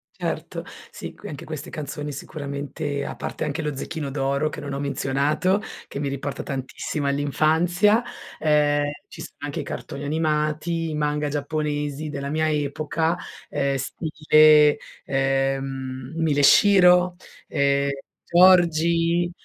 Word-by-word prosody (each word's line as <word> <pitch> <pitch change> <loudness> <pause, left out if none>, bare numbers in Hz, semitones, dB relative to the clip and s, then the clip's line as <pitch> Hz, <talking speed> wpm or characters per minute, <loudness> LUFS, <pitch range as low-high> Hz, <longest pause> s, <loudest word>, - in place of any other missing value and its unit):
Certo, - - -4 0.3
sì, - - -8
qui - - -10
anche 155 +3 -8
queste 155 -1 -6
canzoni 150 0 -5
sicuramente, 140 0 -5
a - - -5
parte - - -5
anche 150 +2 -2
lo 150 -2 -3
zecchino 150 0 -4
d'oro 140 +2 0
che - - -7
non 140 -1 -5
ho 140 - -3
menzionato, 140 +8 0 0.3
che 140 - -6
mi 145 - -2
riporta 140 0 -4
tantissimo 135 +2 -4
all'infanzia, 160 - +2 0.4
uhm, 150 -1 +3 0.3
ci 165 - -11
sono 170 - -10
anche 145 +3 -4
i - - -3
cartoni 140 +1 -6
animati, 155 +2 0
i 155 - -3
manga 150 0 0
giapponesi 150 0 -2
della 140 -1 -4
mia 155 +1 +1
epoca, 155 +3 -1 0.3
ehm, 140 -1 0
stile, 150 +1 +4 0.3
ehm, 135 0 -1
Mila 155 -3 +1
e - - +3
Shiro, 180 -1 +6 0.3
ehm 140 -1 +1 0.4
Georgie, 170 -1 +4
150 Hz, 135 wpm, -24 LUFS, 140-160 Hz, 0.4 s, Shiro